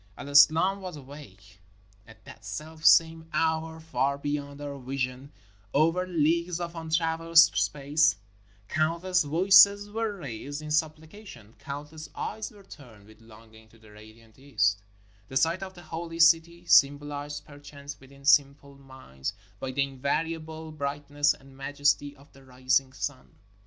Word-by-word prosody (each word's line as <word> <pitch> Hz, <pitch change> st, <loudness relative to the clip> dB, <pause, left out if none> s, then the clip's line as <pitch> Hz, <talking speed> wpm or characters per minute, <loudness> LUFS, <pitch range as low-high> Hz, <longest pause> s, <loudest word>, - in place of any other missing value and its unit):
El 140 Hz, -, -8 dB
Islam 160 Hz, +7 st, +5 dB
was 185 Hz, -3 st, -7 dB
awake. 115 Hz, -10 st, -14 dB, 0.5 s
At 110 Hz, -1 st, -18 dB
that 110 Hz, -, -13 dB
selfsame 160 Hz, +8 st, +2 dB
hour, 160 Hz, 0 st, -1 dB
far 140 Hz, -4 st, -1 dB
be 145 Hz, +1 st, -4 dB
yond 145 Hz, -1 st, -5 dB
our 145 Hz, -1 st, -7 dB
vision, 130 Hz, +1 st, -4 dB, 0.4 s
over 165 Hz, +5 st, +2 dB
leagues 170 Hz, +1 st, 0 dB
of 170 Hz, -1 st, -5 dB
untraversed 165 Hz, 0 st, +3 dB
space, 150 Hz, 0 st, +1 dB, 0.5 s
countless 170 Hz, +6 st, 0 dB
voices 195 Hz, +6 st, +5 dB
were 220 Hz, -1 st, -3 dB
raised 140 Hz, -, -7 dB
in 155 Hz, 0 st, -8 dB
supplication, 155 Hz, -, -4 dB
countless 150 Hz, +2 st, -8 dB
eyes 220 Hz, -, -5 dB
were 205 Hz, -2 st, -17 dB
turned 120 Hz, -, -15 dB
with 110 Hz, +1 st, -19 dB
longing 110 Hz, 0 st, -17 dB
to 115 Hz, -, -21 dB
the 110 Hz, -1 st, -19 dB
radiant 110 Hz, +2 st, -17 dB
east 105 Hz, -8 st, 0 dB, 0.2 s
— 100 Hz, -1 st, -32 dB
the 130 Hz, -, -1 dB
site 165 Hz, +6 st, +1 dB
of 190 Hz, -1 st, -8 dB
the 175 Hz, -, -13 dB
Holy 165 Hz, +1 st, -7 dB
City, 170 Hz, +1 st, +3 dB
symbolized 145 Hz, 0 st, +2 dB
perchance 145 Hz, -1 st, -11 dB
within 140 Hz, +1 st, -17 dB
sim 140 Hz, -1 st, +5 dB
ple 140 Hz, -1 st, -18 dB
minds 130 Hz, -, -8 dB, 0.3 s
by 135 Hz, -, -5 dB
the 135 Hz, +2 st, 0 dB
invariable 160 Hz, +4 st, -4 dB
brightness 145 Hz, 0 st, -1 dB
and 135 Hz, 0 st, -18 dB
majesty 145 Hz, +1 st, -1 dB
of 140 Hz, +1 st, -21 dB
the 135 Hz, -, -18 dB
rising 130 Hz, +1 st, 0 dB
sun. 130 Hz, +1 st, -6 dB
145 Hz, 145 wpm, -27 LUFS, 135-160 Hz, 0.5 s, Islam